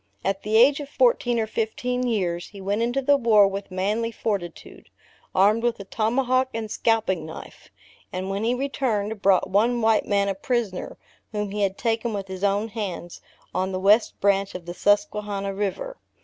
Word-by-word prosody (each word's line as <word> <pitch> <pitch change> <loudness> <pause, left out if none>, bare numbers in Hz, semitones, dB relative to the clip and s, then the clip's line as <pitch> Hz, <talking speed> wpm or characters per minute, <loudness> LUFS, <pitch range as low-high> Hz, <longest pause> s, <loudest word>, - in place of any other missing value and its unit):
At 195 0 0
the 215 +1 +1
age 275 +5 +6
of 285 -1 -7
fourteen 270 - +2
or 220 - +1
fifteen 250 +3 -2
years, 180 -6 -1
he 200 - -12
went 200 +3 -1
into 245 +4 0
the 285 +1 +4
war 220 -5 +5
with 195 +1 -5
manly 210 +5 -1
fortitude, 200 -6 -5 0.5
armed 210 +4 +4
with 235 -1 0
a - - -6
tomahawk 255 +5 +1
and 220 -2 -4
scalping 220 -7 +1
knife; 160 - -11 0.4
and 185 +1 -4
when 195 +2 -2
he 240 +2 +1
returned, 225 -6 -2
brought 195 -2 +3
one 230 +5 +3
white 220 -1 +2
man 200 -1 +2
a 195 - 0
prisoner, 205 -1 -3 0.4
whom 210 -1 -2
he 205 +1 -3
had 195 -1 0
taken 230 -1 -1
with 195 -2 -5
his 190 0 -6
own 205 +2 +1
hands, 190 -6 -6 0.3
on 190 +1 -1
the 185 - -2
west 205 +4 +3
branch 195 0 +1
of 180 -2 -7
the 175 - -6
Susquehannah 205 0 0
river. 195 - -3
210 Hz, 180 wpm, -24 LUFS, 195-230 Hz, 0.5 s, age